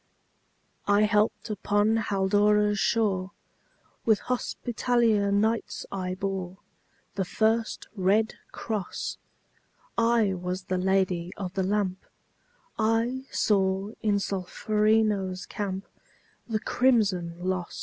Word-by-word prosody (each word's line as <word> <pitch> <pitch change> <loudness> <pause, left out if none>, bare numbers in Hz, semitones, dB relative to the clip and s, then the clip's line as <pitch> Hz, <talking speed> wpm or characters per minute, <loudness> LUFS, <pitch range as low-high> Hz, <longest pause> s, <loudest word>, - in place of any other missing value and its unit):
I 205 +1 +4
helped 210 +2 +1
upon 205 +2 +2
Haldora's 205 0 +2
shore; 195 -5 +1 0.7
With 220 -2 +4
Hospitaller 235 -4 +1
Knights 220 +3 0
I 185 -1 -3
bore 190 -1 -4 0.6
The 195 - -1
first 220 +4 0
red 205 +3 +2 0.2
cross; 210 -5 -4 0.8
I 230 -4 +3
was 180 +1 -4
the 185 0 -2
Lady 185 -2 +1
of 190 -3 -5
the 195 - 0
Lamp; 190 -1 -1 0.8
I 230 +4 +1
saw 195 0 +1
in 210 -2 +2
Solferino's 200 0 0
camp 195 -1 -4 0.6
The 220 -2 -1
crimson 210 -10 +2
loss. 180 0 -3
205 Hz, 100 wpm, -27 LUFS, 190-220 Hz, 0.8 s, I